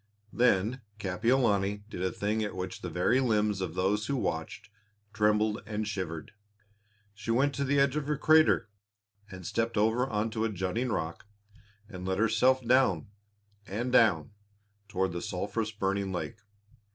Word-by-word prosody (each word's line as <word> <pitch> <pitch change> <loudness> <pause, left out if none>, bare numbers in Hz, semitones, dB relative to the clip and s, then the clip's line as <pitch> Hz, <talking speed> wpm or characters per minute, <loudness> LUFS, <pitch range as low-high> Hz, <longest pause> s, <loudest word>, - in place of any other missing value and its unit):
Then 120 +1 +2 0.2
Kapiolani 105 0 +1
did 100 - -7
a 95 - 0
thing 105 +2 -1
at 105 - -4
which 90 0 -5
the 90 - -4
very 90 +9 +2
limbs 105 -5 +1
of 90 -3 -4
those 100 +3 0
who 140 - 0
watched 80 -1 -4 0.4
trembled 105 0 +2
and 105 0 -3
shivered. 95 +1 -4 0.8
She 105 +2 -9
went 135 +5 +2
to 140 - -1
the 140 +1 +2
edge 140 0 +3
of 150 -2 -2
the 150 -1 0
crater 155 -5 +4 0.6
and 95 -2 -9
stepped 115 +5 -1
over 115 +5 +2
onto 110 +1 -1
a 115 - +1
jutting 100 +5 -2
rock 85 -1 -3 0.6
and 90 -4 -8
let 95 0 0
herself 120 +4 +3
down 115 - +3 0.6
and 120 +6 -3
down 110 -9 +4 0.6
toward 95 -2 -1
the 85 0 -4
sulphurous 105 +4 -2
burning 100 -1 -1
lake. 105 +4 -4
105 Hz, 150 wpm, -29 LUFS, 95-120 Hz, 0.8 s, crater